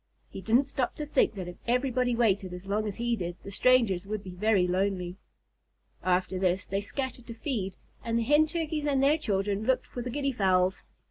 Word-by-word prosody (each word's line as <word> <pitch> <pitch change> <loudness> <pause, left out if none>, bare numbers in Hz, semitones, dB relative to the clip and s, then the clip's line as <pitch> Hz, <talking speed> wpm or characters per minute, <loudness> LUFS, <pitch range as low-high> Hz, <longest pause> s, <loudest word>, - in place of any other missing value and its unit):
He - - -7
didn't 230 +8 +4
stop 265 -2 -2
to 300 - -4
think 295 - +2
that 185 -3 -5
if 175 - -8
everybody 250 0 +1
waited 200 -5 +1
as 180 +1 -8
long 210 +2 -1
as 200 - -4
he 235 0 0
did, 175 -4 -4
the 200 - -8
strangers 205 -5 +3
would 210 -1 -3
be 185 - -8
very 195 0 +2
lonely. 185 -1 -1 0.8
After 185 0 +1
this, 185 0 +1
they 195 +1 -2
scattered 255 +3 -5
to 230 - -7
feed, 220 - -3 0.3
and 230 0 0
the 235 - +1
Hen 295 +5 +4
Turkeys 315 -2 -2
and 275 -2 +2
their 295 +3 +4
children 205 -5 -1
looked 255 +2 +1
for 245 - -6
the 245 - -4
Guinea 275 +2 -1
Fowls. 185 -5 +2
215 Hz, 205 wpm, -29 LUFS, 190-255 Hz, 0.8 s, didn't